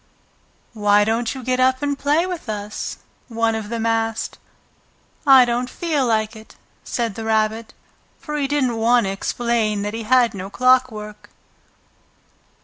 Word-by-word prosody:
"Why 205 -1 +3
don't 225 +3 -1
you 260 - -7
get 255 +1 0
up 260 +1 +2
and 285 0 0
play 295 +5 +1
with 360 -9 -6
us?" 210 0 -5 0.3
one 230 -1 0
of 220 -2 -4
them 230 -1 -3
asked. 225 -1 -1 0.9
"I 265 -2 +8
don't 245 +1 -1
feel 300 -4 -1
like 220 -1 0
it," 220 0 -14 0.3
said 235 -4 -2
the 225 - -7
Rabbit, 220 0 -1 0.4
for 300 -3 -6
he 285 -2 0
didn't 265 -5 0
want 235 +2 +3
to 195 - -1
explain 215 0 -1
that 205 +1 -3
he 225 - -4
had 245 +1 +3
no 195 -1 -6
clockwork. 240 -3 +1
230 Hz, 150 wpm, -21 LUFS, 215-255 Hz, 0.9 s, I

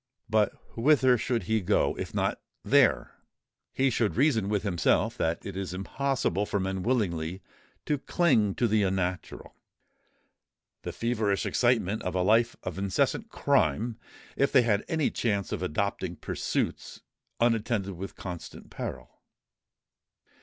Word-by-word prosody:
But 110 -2 +2 0.2
whither 130 0 +4
should 120 0 -1
he 110 -1 0
go, 90 - +1
if - - -5
not - - -1 0.2
there? - - +3 0.5
He 135 0 +1
should 115 -3 0
reason 115 -7 +2
with 105 -2 0
himself 90 -5 +1
that 80 +1 -1
it 100 - -6
is 95 -2 -4
impossible 105 -1 -1
for 100 - -1
men 95 0 -2
willingly 90 -6 -1 0.4
to 145 -2 0
cling 125 - +2
to 120 - +2
the 110 -1 +2
unnatural—the 95 -2 -2 1.4
feverish 110 -4 -1
excitement 115 -4 +1
of 90 0 -3
a 90 - +2
life 115 +4 +3
of - - -5
incessant 100 -1 0
crime, 115 - +1 0.4
if 140 - +2
they 130 -3 +5
had 105 -3 +1
any 160 -3 0
chance 100 -4 -1
of 105 - -3
adopting 90 +1 -2
pursuits - - -3 0.4
unattended 115 -4 +1
with 95 +3 -7
constant 90 -3 -8
peril. - - -7
105 Hz, 130 wpm, -28 LUFS, 95-120 Hz, 1.4 s, they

